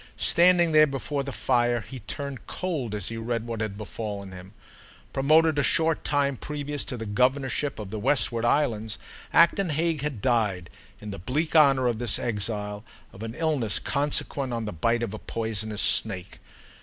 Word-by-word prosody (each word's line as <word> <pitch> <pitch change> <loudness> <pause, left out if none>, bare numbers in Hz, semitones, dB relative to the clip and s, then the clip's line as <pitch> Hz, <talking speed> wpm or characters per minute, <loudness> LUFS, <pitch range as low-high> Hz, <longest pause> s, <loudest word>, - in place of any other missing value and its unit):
Standing 175 -1 +4
there 155 0 +6
before 140 +1 -3
the 140 0 -5
fire 120 -2 +1
he 130 +3 -9
turned 140 +4 -6
cold 145 - -3
as 100 -3 -3
he 115 - -5
read 115 0 -3
what 115 -1 -4
had 105 -2 -3
befallen 105 -2 -6
him. 95 +2 -11 0.6
Promoted 155 +2 +4
a - - +4
short 160 +2 +1
time 140 -2 +1
previous 145 0 -4
to 125 - -5
the 115 - -5
governorship 130 +5 0
of 105 -3 -7
the 110 - -4
Westward 120 -1 +1
Islands, 115 -4 +1 0.3
Acton 170 +2 +4
Hague 160 0 0
had 145 -6 -3
died, 105 -7 0 0.3
in 105 -1 -7
the 100 - -7
bleak 150 - -2
honour 135 -4 +5
of 120 -3 0
this 120 -1 +3
exile, 105 -2 -3 0.3
of 95 - -12
an 115 +1 -5
illness 150 -10 +1
consequent 140 -2 0
on 115 -1 -2
the 105 - -4
bite 115 +8 +1
of 110 - -3
a - - -6
poisonous 110 -2 -3
snake. 95 -4 +1
120 Hz, 175 wpm, -26 LUFS, 110-145 Hz, 0.6 s, there